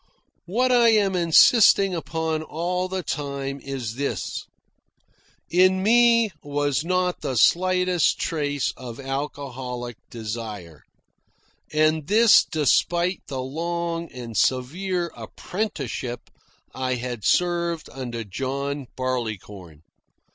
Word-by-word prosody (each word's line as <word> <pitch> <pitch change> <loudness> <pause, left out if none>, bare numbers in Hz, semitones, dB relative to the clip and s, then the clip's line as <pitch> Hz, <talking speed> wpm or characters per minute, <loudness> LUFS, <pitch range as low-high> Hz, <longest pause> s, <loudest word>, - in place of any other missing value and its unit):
What 250 +8 +1
I 240 -2 +5
am 205 -4 +3
insisting 190 +3 +5
upon 160 0 -2
all 175 +4 -2
the 185 0 -4
time 140 -2 -4
is 130 -5 -5
this: 140 0 -3 1.0
in 185 +1 +4
me 230 0 +5
was 145 0 -1
not 180 +1 0
the 130 - -3
slightest 180 +5 +3
trace 145 -4 -1
of 120 -2 -9
alcoholic 130 -3 -5
desire, 105 -8 -7 0.9
and 155 0 +2
this 220 +2 +6
despite 170 +4 +1
the 130 -2 -4
long 170 +3 -3
and 120 -3 -8
severe 170 - 0
apprenticeship 135 - -5 0.4
I 130 -1 -1
had 120 -3 -5
served 170 -2 +1
under 120 -3 -5
John 135 +6 -4
Barleycorn. 105 - -5
150 Hz, 100 wpm, -24 LUFS, 130-180 Hz, 1.0 s, this